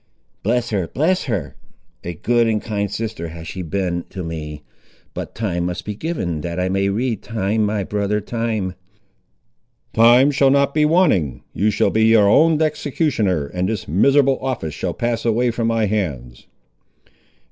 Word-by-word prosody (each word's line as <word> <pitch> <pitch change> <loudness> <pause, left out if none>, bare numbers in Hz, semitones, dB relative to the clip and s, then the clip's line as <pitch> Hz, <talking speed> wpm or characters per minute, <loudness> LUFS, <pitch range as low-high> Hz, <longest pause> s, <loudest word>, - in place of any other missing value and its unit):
"Bless 120 +2 0
her, 95 -5 -1
bless 175 - 0
her! 95 - -3 0.5
a 85 0 -5
good 120 +7 +2
and 110 -1 +1
kind 100 -2 -3
sister 105 -5 -4
has 80 0 -9
she 95 - -5
been 90 0 -2
to 95 - -6
me. 75 -2 -6 0.5
But - - -6
time 90 -6 -1
must 90 0 -5
be 105 - -3
given, 100 - -3
that 85 +2 -4
I 90 0 0
may 95 +1 +1
read; 115 +1 -1
time, 110 -1 -1
my 105 -1 -1
brother, 105 +1 -1
time!" 110 -4 -2 1.2
"Time 120 +5 +6
shall 135 -1 +3
not 140 +1 +3
be 150 -1 +3
wanting. 125 - +2
You 105 +4 +1
shall 105 - +1
be 110 0 +3
your 110 -2 +5
own 155 +8 +4
executioner, 140 - 0
and 90 +6 -2
this 110 -4 -3
miserable 135 - +3
office 125 - -3
shall - - -3
pass 120 -1 -1
away 120 +1 +2
from 115 0 -1
my 115 -1 +1
hands." 70 - -3
105 Hz, 165 wpm, -20 LUFS, 90-120 Hz, 1.2 s, Time